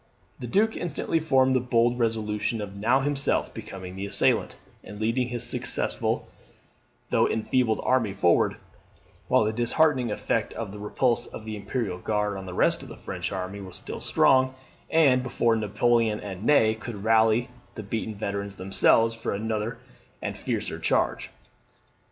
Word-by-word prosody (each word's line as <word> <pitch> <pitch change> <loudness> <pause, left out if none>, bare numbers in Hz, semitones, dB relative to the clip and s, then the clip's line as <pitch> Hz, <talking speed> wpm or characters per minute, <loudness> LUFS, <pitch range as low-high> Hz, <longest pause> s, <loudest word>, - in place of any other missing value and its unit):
The 125 - -5
Duke 215 - +2
instantly 165 -1 -1
formed 130 -4 +3
the 130 - +3
bold 120 0 +1
resolution 110 -1 -1
of 100 -1 -6
now 120 +7 +2
himself 140 0 0
becoming 95 -4 -8
the 95 +1 -4
assailant, 100 0 +2 0.3
and 105 - -10
leading 115 +3 0
his 120 -1 -3
successful - - 0 0.8
though - - +3
enfeebled 110 0 +1
army 125 -5 +2
forward, 95 -3 +2 0.7
while - - +4
the 110 +1 0
disheartening 125 +2 +3
effect 105 - -1
of 110 -4 -5
the 105 - -9
repulse 120 +3 0
of 110 - -10
the 110 -1 -5
Imperial 100 -3 -3
Guard 105 0 -1
on 95 -1 -7
the 90 - -6
rest - - +2
of - - -10
the - - -10
French - - -5
army 95 +1 -5
was 95 -2 -8
still - - -7
strong, 130 0 +3 0.3
and 140 -6 +4
before 120 -2 +1
Napoleon 110 +1 +1
and 100 -1 -7
Ney 110 -7 +5
could 110 -2 -8
rally 110 +2 +3 0.3
the 110 - -6
beaten 110 +1 -4
veterans 100 -1 -4
themselves 95 +4 +3
for 115 -2 -3
another 110 +2 -3 0.4
and - - -4
a - - -12
fiercer - - -3
charge. - - 0
110 Hz, 160 wpm, -26 LUFS, 105-125 Hz, 0.8 s, Ney